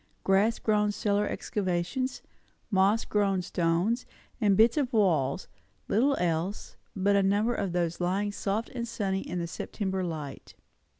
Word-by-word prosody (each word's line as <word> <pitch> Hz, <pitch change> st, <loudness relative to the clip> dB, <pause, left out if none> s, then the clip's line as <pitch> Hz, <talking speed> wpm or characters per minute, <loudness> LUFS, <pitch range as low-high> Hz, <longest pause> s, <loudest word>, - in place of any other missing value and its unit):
Grass 200 Hz, +4 st, +3 dB
grown 210 Hz, -1 st, +2 dB
cellar 205 Hz, 0 st, 0 dB
excavations, 195 Hz, +7 st, -2 dB, 0.5 s
moss 200 Hz, +3 st, +3 dB
grown 195 Hz, -3 st, +1 dB
stones 175 Hz, +8 st, 0 dB, 0.3 s
and 200 Hz, -3 st, +4 dB
bits 225 Hz, +1 st, +5 dB
of 275 Hz, -5 st, 0 dB
walls; 175 Hz, -, +1 dB, 0.4 s
little 270 Hz, +7 st, +3 dB
else; 175 Hz, +3 st, -2 dB, 0.2 s
but 200 Hz, +1 st, +2 dB
a 200 Hz, -, +4 dB
number 205 Hz, +5 st, +2 dB
of 200 Hz, -5 st, -2 dB
those 170 Hz, -1 st, -1 dB
lying 195 Hz, +4 st, 0 dB
soft 205 Hz, +2 st, -2 dB
and 235 Hz, -2 st, -4 dB
sunny 195 Hz, -4 st, -2 dB
in 180 Hz, -, -5 dB
the 170 Hz, -, -1 dB
September 190 Hz, +2 st, -3 dB
light. 155 Hz, -5 st, -6 dB
200 Hz, 140 wpm, -28 LUFS, 180-215 Hz, 0.5 s, bits